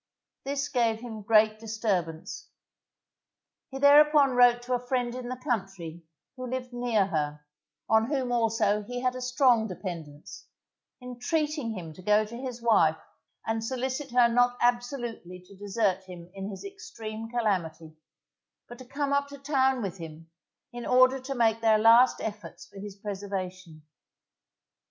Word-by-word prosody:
This 280 +1 -2
gave 230 -4 0
him 225 -3 -7
great 215 +1 +3
disturbance. 200 -8 -3 1.2
He 270 - -7
thereupon 290 0 +6
wrote 245 -1 +4
to 250 +1 -3
a 245 - +1
friend 245 -1 -1
in 250 -1 -6
the 255 - -3
country, 195 - -4 0.3
who 255 -1 -6
lived 250 0 -5
near 240 -4 +1
her, 150 -4 -3 0.4
on 220 +1 +3
whom 265 -3 -1
also 225 -3 +1
he 245 +4 -6
had 255 0 0
a 255 - -6
strong 250 -3 +3
dependance, 170 -6 -8 0.6
entreating 250 - -2
him 165 -3 -8
to 185 - -13
go 210 +3 +3
to 225 +2 -10
his 245 -1 -7
wife 165 -9 +4 0.5
and 225 0 -2
solicit 260 +3 -3
her 245 -1 +5
not 245 +1 +2
absolutely 240 -6 -2
to 180 +2 -17
desert 200 -1 -1
him 180 -1 -11
in 195 +1 -6
his 195 - -8
extreme 230 - -8
calamity, 175 -9 -2 0.7
but 240 +1 -11
to 255 - -10
come 280 +2 -2
up 280 0 +1
to 280 0 -10
town 265 -3 +1
with 190 -2 -5
him, 165 0 -10 0.4
in 240 0 -6
order 255 +2 +4
to 270 +1 -5
make 225 -2 +2
their 220 -1 +4
last 230 +3 +6
efforts 210 -1 -7
for 200 - -13
his 200 -1 -8
preservation. 190 -5 -6
230 Hz, 150 wpm, -27 LUFS, 195-255 Hz, 1.2 s, thereupon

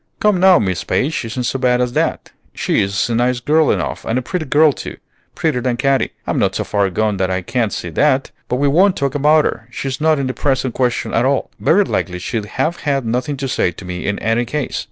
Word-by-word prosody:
"Come, 210 -3 +2
now, 190 0 +6
Miss 95 -5 -1
Page 150 +2 -1
isn't 115 +3 -4
so 135 - -1
bad 125 -1 +2
as 125 -1 0
that. - - -1 0.2
She - - +1
is 100 +1 0
a 120 - -2
nice 120 +2 +1
girl 155 +4 +2
enough, - - -1
and 115 - -1
a 130 - -1
pretty 175 +3 -3
girl 150 +1 +4
too, - - -8 0.4
prettier 150 -7 0
than 125 -1 -1
Katy; 135 +1 +1
I'm - - -1
not - - +1
so - - -1
far 100 -2 0
gone 105 +2 0
that 95 0 0
I 95 0 -1
can't 115 +1 -1
see 90 - -4
that. 135 - +1 0.2
But - - 0
we 140 +3 +1
won't 185 +7 +3
talk 140 -1 -1
about 150 +1 +4
her, 110 - -3
she's 130 +2 -5
not 155 0 +3
in 140 - -1
the 130 - -2
present 130 -3 -1
question 125 -2 -1
at 115 - +2
all; 135 0 0
very 200 +5 +4
likely 90 - -2
she'd 105 +4 -3
have 160 +10 -2
had 140 -4 -1
nothing 125 +5 -2
to 135 0 -3
say 125 - +1
to 95 - -11
me 90 0 -5
in 100 0 -1
any 115 +2 0
case. 140 +3 -3
130 Hz, 240 wpm, -18 LUFS, 115-145 Hz, 0.4 s, now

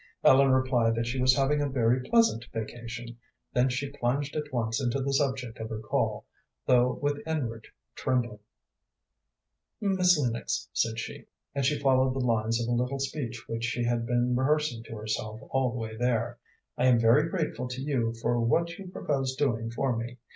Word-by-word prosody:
Ellen 135 +1 +6
replied 130 -3 +3
that 115 0 -1
she 125 +2 -2
was 130 0 +5
having 145 +2 +2
a 145 - 0
very 125 -1 +2
pleasant 225 - +3
vacation, 120 +1 -6 0.3
then 125 +1 +3
she 135 +2 -2
plunged 140 +1 -1
at 150 -1 -3
once 115 -1 -1
into 125 +1 0
the 135 +1 -1
subject 135 -4 -1
of 110 0 -5
her 110 - -4
call, 110 - -1 0.4
though 125 0 +3
with 145 0 0
inward 120 -8 -3 0.3
trembling. 120 -5 -1 1.4
"Miss 185 -4 +3
Lennox," 120 -5 -1
said 115 0 0
she 115 - -6 0.3
and 140 0 -1
she 150 +1 +1
followed 130 -2 +3
the 130 -2 -1
lines 115 0 +1
of 115 - -2
a - - -1
little 125 +3 -1
speech 130 -4 -4
which 115 0 -4
she 120 0 -1
had 120 -1 0
been 120 +1 +1
rehearsing 135 -2 +1
to 115 - -8
herself 110 0 -3
all 135 -2 +2
the 125 - -5
way 110 -1 -5
there 120 0 0 0.4
"I 125 - +4
am 125 -2 +5
very 125 +8 +4
grateful 155 -8 -2
to 125 +1 -6
you 120 -6 0
for 120 0 +2
what 170 - +1
you 195 - -8
propose 135 -7 -2
doing 115 -5 0
for 125 +2 0
me. 120 +2 -5
125 Hz, 185 wpm, -28 LUFS, 115-140 Hz, 1.4 s, Ellen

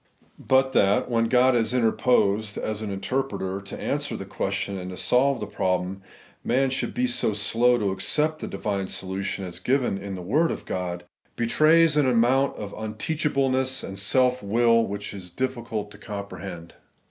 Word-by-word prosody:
But 130 0 +3
that, 100 -1 +2
when 115 -1 +2
God 125 +2 +4
has 120 +1 +1
interposed, 110 -3 +2
as 110 0 -3
an 110 - -4
inter 100 +7 -1
preter, 95 -7 -4
to 100 - -8
answer - - -2
the - - -7
question 100 - -3
and 90 0 -6
to 90 - -7
solve 130 +4 +2
the 105 - -3
problem, 95 -1 -1 0.4
man 130 +2 +1
should 135 - -2
be 250 +1 +1
so 240 - 0
slow 120 +4 +2
to 100 -4 0
accept 155 +10 0
the - - -5
divine 100 -2 -3
solution 95 +1 -3
as 90 -1 -7
given 125 -2 0
in 100 0 -6
the 90 - -7
word 150 - +2
of - - -5
God, 90 -1 -4 0.3
betrays 155 +6 +4
an 140 -3 +4
amount 125 +3 +3
of 100 -1 -6
imteachableness 130 +3 -1
and 95 0 -6
self 125 +5 +2
will 115 +2 +3
which 100 +1 -5
it - - -7
is 90 -2 -8
difficult 115 -1 -3
to 100 - -14
comprehend. 100 -5 -7
110 Hz, 175 wpm, -25 LUFS, 100-130 Hz, 0.4 s, God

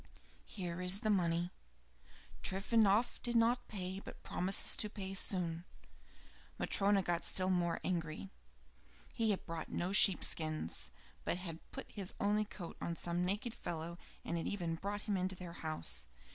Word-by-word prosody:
"Here 180 -2 -4
is 180 +2 +3
the 215 - +2
money. 175 -2 +1 0.9
Trifonof 210 +3 +3
did 240 -1 -1
not 235 +2 +3
pay, 190 -2 -3
but - - -11
promises 190 +2 +3
to 210 - 0
pay 195 -2 -5
soon." 175 -3 +2 0.9
Matryona 200 0 +3
got 175 -1 0
still 185 0 +1
more 175 -2 +1
angry; 155 - -2 0.8
he 225 -1 +1
had 200 - 0
bought 165 -2 -5
no 180 +2 -1
sheep 195 -2 +6
skins, 155 - -1 0.3
but - - 0
had 170 -3 -6
put - - -7
his 195 -3 -5
only 210 +1 +2
coat 180 -4 -8
on 170 - -2
some 175 +1 -1
naked 210 +6 -1
fellow 170 -5 -5 0.3
and 170 - -1
had - - -3
even 175 -5 -1
brought 200 +5 -3
him 190 -4 0
to 190 - -4
their 180 -2 -7
house. 80 - +1
185 Hz, 155 wpm, -36 LUFS, 170-200 Hz, 0.9 s, sheep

